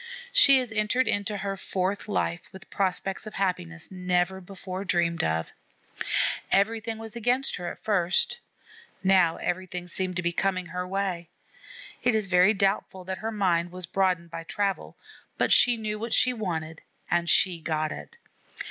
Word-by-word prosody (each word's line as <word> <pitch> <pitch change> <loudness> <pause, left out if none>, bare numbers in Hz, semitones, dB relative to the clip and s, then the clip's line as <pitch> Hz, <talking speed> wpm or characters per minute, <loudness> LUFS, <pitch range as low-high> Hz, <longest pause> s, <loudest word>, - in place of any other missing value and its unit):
She 275 - +8
has 250 -3 -1
entered 225 +4 +1
into 205 +1 -1
her 195 0 -3
fourth 190 +1 -2
life 175 -4 -2
with 190 -1 -13
prospects 195 +1 -1
of 215 - -8
happiness 175 -4 -2
never 180 0 0
before 185 0 -7
dreamed 170 -2 +1
of. 80 0 -1 1.0
Everything 225 +3 +1
was 225 0 -9
against 245 +4 +1
her 175 -2 -4
at - - -13
first; 180 -4 +2 0.6
now 185 -3 +4
everything 180 0 -3
seems 185 +1 -3
to 175 - -2
be 175 - +1
coming 185 +1 0
her 180 +1 -4
way. 185 -3 -2 0.7
It 245 -2 +2
is 215 -2 +1
very 185 +3 +4
doubtful 195 -1 0
that 190 +1 -5
her 225 +1 -3
mind 175 -5 +1
was 180 0 -5
broadened 180 -2 0
by 165 - -6
travel, 200 +2 -2 0.4
but - - +3
she 245 -1 +6
knew 215 -1 -3
what 230 +1 -1
she 250 - +4
wanted 165 -8 -4 0.3
and 170 0 +2
she 180 -3 +4
got 155 -1 -1
it. 470 - -8
190 Hz, 160 wpm, -27 LUFS, 175-210 Hz, 1.0 s, She